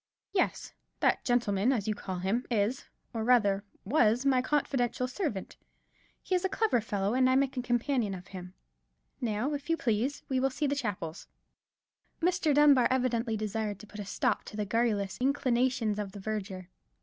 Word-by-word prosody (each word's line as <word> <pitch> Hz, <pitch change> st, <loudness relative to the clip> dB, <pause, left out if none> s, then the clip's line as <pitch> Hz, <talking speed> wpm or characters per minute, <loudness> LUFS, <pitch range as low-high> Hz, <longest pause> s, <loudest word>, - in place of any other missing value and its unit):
"Yes, 370 Hz, -, 0 dB, 0.3 s
that -, -, +2 dB
gentleman, 235 Hz, -2 st, +2 dB
as 220 Hz, -6 st, -1 dB
you 215 Hz, -, +1 dB
call 190 Hz, -3 st, -5 dB
him, 195 Hz, +7 st, 0 dB
is, 230 Hz, +3 st, 0 dB, 0.3 s
or 225 Hz, -1 st, -2 dB
rather 205 Hz, -5 st, +3 dB, 0.2 s
was, 240 Hz, +1 st, +3 dB
my 260 Hz, -2 st, +4 dB
confidential 255 Hz, -3 st, 0 dB
servant. 255 Hz, -, -4 dB, 0.7 s
He -, -, -3 dB
is 365 Hz, 0 st, +2 dB
a 380 Hz, -, +1 dB
clever 425 Hz, -, +1 dB
fellow, 205 Hz, -1 st, -1 dB
and 255 Hz, 0 st, +4 dB
I 260 Hz, -, +4 dB
make 270 Hz, 0 st, +2 dB
a 250 Hz, -, -1 dB
companion 240 Hz, -3 st, 0 dB
of 180 Hz, 0 st, -11 dB
him. 180 Hz, -1 st, -9 dB, 0.7 s
Now, 235 Hz, +4 st, -1 dB
if 290 Hz, +2 st, -5 dB
you 330 Hz, -, +2 dB
please, 240 Hz, +4 st, -1 dB
we 260 Hz, -1 st, 0 dB
will 270 Hz, +1 st, +2 dB
see 280 Hz, +3 st, -2 dB
the 280 Hz, -, +1 dB
chapels." 200 Hz, -, -4 dB, 0.9 s
Mr. 350 Hz, -2 st, +2 dB
Dunbar 285 Hz, -3 st, +6 dB
evidently 245 Hz, -3 st, 0 dB
desired 215 Hz, -1 st, -2 dB
to 215 Hz, -, -12 dB
put 215 Hz, 0 st, -11 dB
a 205 Hz, -, -4 dB
stop 245 Hz, +3 st, 0 dB
to 210 Hz, -, -9 dB
the 210 Hz, -, -1 dB
garrulous 210 Hz, -2 st, 0 dB
inclinations 250 Hz, -5 st, +1 dB
of 200 Hz, -2 st, -4 dB
the 205 Hz, -, -8 dB
verger. 190 Hz, -3 st, -5 dB
235 Hz, 175 wpm, -30 LUFS, 205-265 Hz, 0.9 s, Dunbar